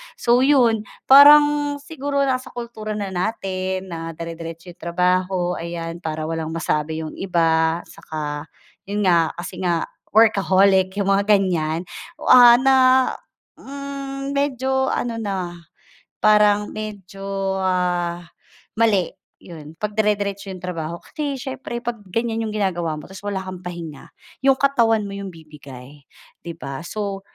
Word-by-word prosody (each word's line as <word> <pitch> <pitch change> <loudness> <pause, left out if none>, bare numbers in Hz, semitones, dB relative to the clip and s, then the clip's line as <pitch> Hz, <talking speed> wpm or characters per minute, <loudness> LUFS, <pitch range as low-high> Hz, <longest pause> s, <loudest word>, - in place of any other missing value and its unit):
So 240 +1 +3
'yun, 245 -6 +3 0.2
parang 290 +1 +7
siguro 285 -2 -2
nasa 255 -1 -1
kultura 220 -3 -5
na 200 -2 -4
natin 185 -1 -3
na 165 -1 -6
dire-diretso 165 +1 -8
'yung 175 - -20
trabaho, 180 +1 0
ayan, 170 0 -5
para 160 -2 -4
walang 160 0 -3
masabi 160 -1 -2
'yung 155 - -6
iba, 165 -2 +1
tsaka, 150 -2 -6 0.4
'yun 205 +1 -1
nga, 170 -4 +3
kasi 175 - -7
nga 175 -3 0 0.3
workaholic, 195 -3 +4
'yung 200 -1 0
mga 200 +1 +2
ganiyan. 175 -5 +1 0.4
Oh, - - +2
ah, 240 -1 +9
na, 265 +2 +3 0.8
hmm, 275 0 -6
medyo 265 -1 0
ano 230 -1 -2
na, 185 -5 -4 0.6
parang 210 -1 +4
medyo, 195 -2 -5
ah, 180 -2 0 0.6
mali 205 -6 +3 0.3
'yon, 160 -2 -12
'pagdire-diretso 205 -1 -1
'yong 185 -1 -8
trabaho. 170 -2 -4
Kasi 290 - -5
siyempre 260 -2 -6
'pag 235 -2 -4
ganiyan 225 +2 -2
'yong 215 - -6
ginagawa 175 -6 -1
mo 150 - -9
tapos 190 0 -11
wala 195 -2 -3
kang 185 -1 -7
pahinga, 170 -4 -8 0.3
'yong 270 0 +4
katawan 235 -6 +2
mo 200 - -6
'yong 200 0 -6
bibigay 145 -5 -13 0.4
'di 170 -1 -8
ba? 140 -3 -6
So 200 +2 -4
195 Hz, 135 wpm, -21 LUFS, 170-230 Hz, 0.8 s, ah